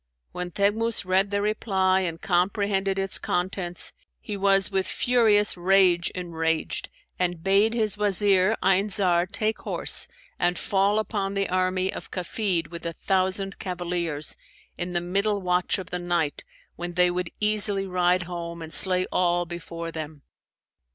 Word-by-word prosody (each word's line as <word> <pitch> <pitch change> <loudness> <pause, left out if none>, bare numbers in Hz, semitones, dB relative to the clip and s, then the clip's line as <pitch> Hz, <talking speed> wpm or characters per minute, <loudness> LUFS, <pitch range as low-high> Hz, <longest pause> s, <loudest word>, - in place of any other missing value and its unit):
When 180 0 -5
Teghmus 205 +4 0
read 190 +2 +2
the 200 0 -1
reply 190 -3 +1
and 170 -3 -3
comprehended 195 +2 0
its 195 0 0
contents, 180 -1 -2 0.3
he 210 - -6
was 195 0 +2
with 190 -1 0
furious 220 -4 +3
rage 180 -1 +3
enraged 165 -3 -2 0.3
and 175 -2 -1
bade 200 +4 +3
his 215 -3 -1
Wazir 200 0 +3
Ayn 195 +2 +2
Zar 180 -3 +2
take 215 +3 -1
horse - - +5 0.3
and 175 0 +1
fall 200 +1 +1
upon 200 -2 -2
the 195 0 -1
army 185 +1 0
of - - -8
Kafid 180 -3 -3
with 170 - -8
a 165 - -4
thousand 190 +2 -2
cavaliers, 175 -4 -2 0.4
in 180 0 -5
the 175 - 0
middle 200 +4 0
watch 180 0 0
of 185 -2 -8
the 180 - -3
night 175 -4 -2 0.3
when 175 0 -5
they 180 0 +3
would 180 -1 -3
easily 210 -2 +3
ride 180 -1 +1
home 170 -1 -7
and 160 - -9
slay 185 -1 +4
all 175 -1 +1
before 170 -1 -7
them. 155 -3 -8
185 Hz, 150 wpm, -25 LUFS, 175-200 Hz, 0.4 s, horse